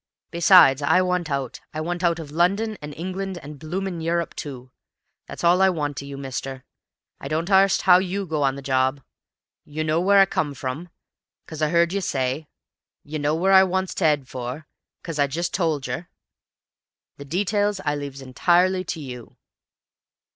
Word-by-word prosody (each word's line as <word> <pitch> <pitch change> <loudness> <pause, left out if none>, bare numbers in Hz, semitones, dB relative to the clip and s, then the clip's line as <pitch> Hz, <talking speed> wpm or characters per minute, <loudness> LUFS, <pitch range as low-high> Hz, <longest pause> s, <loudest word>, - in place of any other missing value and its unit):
Besides, 170 -5 +6
I 180 +6 +3
want 180 -3 -1
out. 140 -3 -3
I - - -2
want 175 +3 -3
out 170 -1 +2
of 155 -4 -8
London, 200 +7 +1
an' 150 0 -7
England, 185 +3 -5
an' 150 +1 -9
bloomin' 175 +3 -4
Europe 170 0 -1
too. 130 -3 -8 0.6
That's - - -8
all 175 +2 +4
I 190 - +6
want 145 -6 -3
of 140 - -9
you, 140 -1 -7
mister. 135 -1 -6 0.6
I - - -7
don't 160 +6 -2
arst 195 0 +4
how 180 -1 +7
YOU 195 +1 -3
go 155 -3 -2
on 135 -1 +2
the 140 - -9
job. 130 +1 +1 0.6
You 155 +1 -4
know 155 +1 +1
w'ere 200 +3 +4
I - - +7
come 150 -6 -2
from, 135 +7 -5 0.6
'cos 155 -1 -8
I 155 -1 +1
'eard 170 +1 +3
you 200 - -1
say; 135 -1 -2 0.6
you 155 +1 -5
know 145 +1 +1
w'ere 185 +4 +1
I 190 0 +8
want 190 0 -1
to - - -4
'ead 150 -4 +2
for, 130 +5 -6 0.4
'cos 165 -3 -5
I've 140 -1 +3
just 170 +5 -3
told 160 -6 0
yer; 170 +2 -4 1.1
the 140 - -9
details 205 +5 0
I 145 - +1
leaves 140 -2 -7
entirely 180 +8 +2
to 165 - -5
you." 125 -5 -9
160 Hz, 185 wpm, -23 LUFS, 140-180 Hz, 1.1 s, I